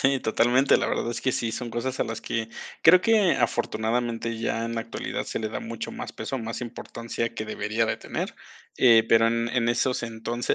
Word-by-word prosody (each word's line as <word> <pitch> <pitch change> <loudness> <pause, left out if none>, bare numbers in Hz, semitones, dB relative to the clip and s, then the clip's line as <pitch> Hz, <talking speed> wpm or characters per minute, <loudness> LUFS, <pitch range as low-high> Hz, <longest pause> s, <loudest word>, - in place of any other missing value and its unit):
Sí, 135 -1 +3
totalmente, 125 +4 +4
la - - 0
verdad 120 - -1
es 120 - -4
que 130 - +1
sí. 115 -1 -1
Son 120 0 -4
cosas 130 +3 -3
a - - +3
las 115 0 -5
que 115 -1 -3 0.3
creo 180 +3 +8
que 215 -4 +4
afortunadamente, 115 0 -1
ya 115 0 -1
en 115 - -4
la 115 - -1
actualidad, 115 - -4
se - - -4
le 110 - -2
da 110 - -4
mucho 115 0 -5
más - - -6
peso, 135 - -4
más 115 0 -5
importancia, 115 -1 -5
que 110 - -4
debería 110 +1 -1
de - - -1
tener. - - -4 0.4
Eh, 115 -3 +6
pero 115 0 +6
en 115 0 +1
en 120 -1 +1
esos 120 +2 +1
entonces, 115 +1 -2
115 Hz, 210 wpm, -26 LUFS, 115-125 Hz, 0.4 s, creo